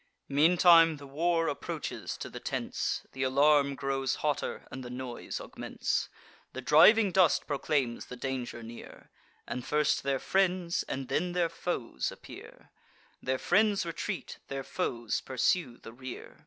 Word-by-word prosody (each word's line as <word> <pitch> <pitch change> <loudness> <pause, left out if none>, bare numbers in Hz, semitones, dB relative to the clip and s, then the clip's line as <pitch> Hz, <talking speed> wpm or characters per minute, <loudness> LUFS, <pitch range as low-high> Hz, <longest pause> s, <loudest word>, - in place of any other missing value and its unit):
Meantime 165 +2 +6
the 140 - -11
war 165 +4 +1
approaches 145 - -4
to - - -6
the - - -8
tents; - - -3
Th' 130 - -6
alarm 140 +1 +4
grows 135 -1 -1
hotter, 150 -2 -1
and 130 - -6
the 125 - -7
noise 125 -1 -5
augments: - - -3 0.4
The 130 - -5
driving 195 - +6
dust 180 -3 +4
proclaims 140 -4 -1
the 125 - -7
danger 125 -2 -4
near; 115 +1 -11 0.4
And 125 - -4
first 150 +3 +1
their 135 -1 0
friends, 180 +1 +1
and 135 -1 -3
then 175 +6 -1
their 175 -2 +1
foes 150 - -3
appear: - - -13 0.5
Their 130 0 -1
friends 205 +5 +2
retreat; 170 +4 -5
their 135 0 -4
foes 120 -3 -2
pursue 130 0 0
the 115 - -12
rear. 130 0 -9
140 Hz, 140 wpm, -30 LUFS, 130-170 Hz, 0.5 s, Meantime